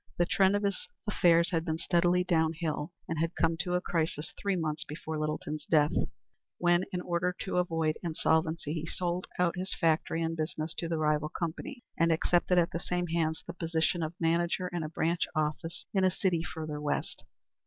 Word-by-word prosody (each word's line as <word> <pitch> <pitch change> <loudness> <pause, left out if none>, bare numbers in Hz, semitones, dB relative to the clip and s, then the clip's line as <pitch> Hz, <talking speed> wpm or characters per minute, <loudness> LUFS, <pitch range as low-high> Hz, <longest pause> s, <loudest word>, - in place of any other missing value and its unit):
The 175 - +3
trend 190 +2 +4
of 205 - 0
his 200 -2 -1 0.2
affairs 170 -5 +4
had 165 -2 +1
been 160 -2 -1
steadily 175 +1 +3
downhill, 160 -2 0 0.2
and 165 -1 -2
had 165 +2 0
come 165 0 +2
to 180 +2 -1
a 180 - +1
crisis 160 -3 -1
three 200 -1 -1
months 155 -2 -1
before 155 0 -5
Littleton's 155 0 -3
death, 150 -2 +4 0.7
when, 175 +1 +3
in 180 - -2
order 180 +1 0
to 190 - -2
avoid 165 -3 +1
insolvency, 160 -2 +1
he 160 -1 -3
sold 175 +1 -2
out 180 -1 +2
his 185 +1 -3
factory 165 0 +1
and 165 0 -1
business 155 0 -3
to 165 - -2
the 165 - 0
rival 150 -1 +1
company, 175 - -5 0.2
and 165 0 +4
accepted 175 +2 +2
at 170 -1 +3
the 170 - -2
same 180 0 -1
hands 160 -1 0
the 170 - -6
position 165 0 0
of 160 +1 -3
manager 170 +2 +1
in 175 -1 -3
a 155 - -3
branch 165 +2 0
office 155 +3 -2
in 190 -2 +3
a 185 - +6
city 180 -2 +1
further 155 -3 -5
west. 150 - -2
165 Hz, 190 wpm, -30 LUFS, 160-180 Hz, 0.7 s, a